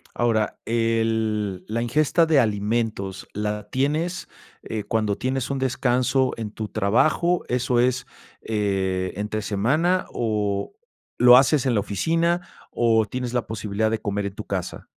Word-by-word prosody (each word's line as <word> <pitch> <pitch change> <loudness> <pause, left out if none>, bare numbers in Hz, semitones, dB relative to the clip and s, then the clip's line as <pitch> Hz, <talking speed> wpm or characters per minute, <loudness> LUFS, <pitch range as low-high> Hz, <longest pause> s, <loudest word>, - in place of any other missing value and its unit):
Ahora, 115 -3 0
el 110 -4 0
la 115 +2 -1
ingesta 155 +7 +2
de 155 -3 +4
alimentos, 105 -3 -1
¿la 105 0 -3
tienes, 155 +7 -1 0.3
eh, 110 -2 -4
cuando 110 -2 0
tienes 130 +2 -2
un 135 - -1
descanso 130 0 +1
en 110 -2 -5
tu 110 0 -6
trabajo, 155 - +2
eso 125 0 +1
es, 125 0 +1 0.4
eh, 95 -4 -1
entre 105 +1 -3
semana, 145 - +1
o 105 - -1 0.4
lo 125 0 +8
haces 135 0 +3
en 130 - +2
la 105 - +2
oficina, 165 - 0 0.3
o 115 -2 +2
tienes 125 +2 -4
la 120 -2 -1
posibilidad 110 0 -1
de 110 -1 -2
comer 100 0 -2
en 100 - -5
tu - - -7
casa? - - -4
115 Hz, 145 wpm, -23 LUFS, 105-130 Hz, 0.4 s, lo